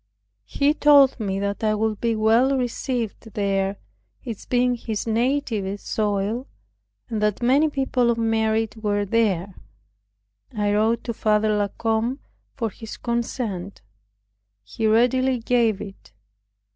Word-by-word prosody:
He 285 +1 +2
told 285 -4 +5
me 195 -3 -2
that 200 +2 -3
I 215 -1 +2
would 215 0 -1
be 230 -1 +1
well 230 +5 +3
received 240 -3 -3
there, 195 -1 0 0.5
it 230 -5 -7
being 250 0 +2
his 225 -3 -4
native 225 -4 -1
soil, 210 +5 -2 0.6
and 220 -3 -3
that 210 +2 0
many 280 +6 +4
people 265 -3 0
of 235 - +1
merit 225 -1 0
were 205 -2 -1
there. 200 -4 0 1.0
I 205 -1 +1
wrote 220 +2 +1
to 235 - -3
Father 215 -1 +1
La 205 -1 +1
Combe 225 +4 -1 0.4
for 225 -5 -2
his 220 +3 -9
consent. 230 - -3 0.8
He 105 - -2
readily 250 +4 +3
gave 230 -3 +1
it. 195 - -10
225 Hz, 130 wpm, -23 LUFS, 210-245 Hz, 1.0 s, told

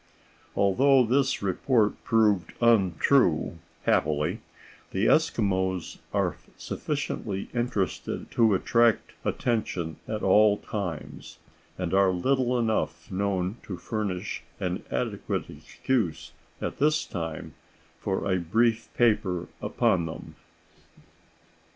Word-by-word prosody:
Although 130 +7 +4
this 135 0 +1
report 105 +3 +1
proved 105 -6 +2
untrue, 95 - +3 0.2
happily, 75 0 +1 0.5
the 95 +3 0
Eskimos 95 - +1
are - - 0 0.2
sufficiently 95 -1 -4
interesting 120 -6 -2
to 110 -4 +4
attract 115 +3 +2
attention 90 - -1
at 110 -1 -3
all 105 +2 +5
times, 90 -9 -6 0.4
and 90 -1 -3
are 95 0 +5
little 125 +7 +1
enough 90 -8 -1
known 95 +1 -1
to 95 - -7
furnish 100 -3 -3 0.2
an - - -2
adequate - - -2
excuse 115 -12 -2 0.3
at - - -4
this 155 +2 +2
time 80 -3 -5 0.5
for 95 - -2
a 95 -2 +1
brief 115 +6 +1
paper 95 -7 +1
upon 95 -9 +1
them. 80 - -8
100 Hz, 100 wpm, -27 LUFS, 90-115 Hz, 0.5 s, all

